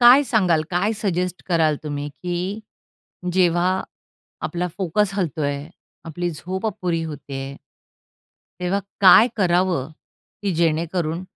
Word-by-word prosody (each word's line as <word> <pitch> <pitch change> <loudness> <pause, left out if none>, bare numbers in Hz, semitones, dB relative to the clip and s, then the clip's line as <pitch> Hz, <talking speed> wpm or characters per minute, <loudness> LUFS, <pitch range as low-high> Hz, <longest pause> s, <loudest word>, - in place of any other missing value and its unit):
"काय 245 +4 +8
सांगाल, 180 -9 +3
काय 190 +5 +1
सजेस्ट 180 -2 -1
कराल 160 -3 +3
तुम्ही, 145 -1 -4
की 180 +7 -4 0.7
जेव्हा 180 +1 +2 0.6
आपला 180 0 -2
फोकस 195 +2 +1
हलतो 165 -6 -1
आहे, 145 +2 -2 0.4
आपली 175 +2 -3
झोप 185 +6 -4
अपुरी 180 -5 -1
होते 145 -3 -7
आहे" 135 +1 -7 1.0
"तेव्हा 180 +2 +1 0.2
काय 200 +4 +8
करावं, 175 -6 +1 0.5
की 200 - 0
जेणेकरून 165 +1 0
175 Hz, 115 wpm, -22 LUFS, 160-190 Hz, 1.0 s, काय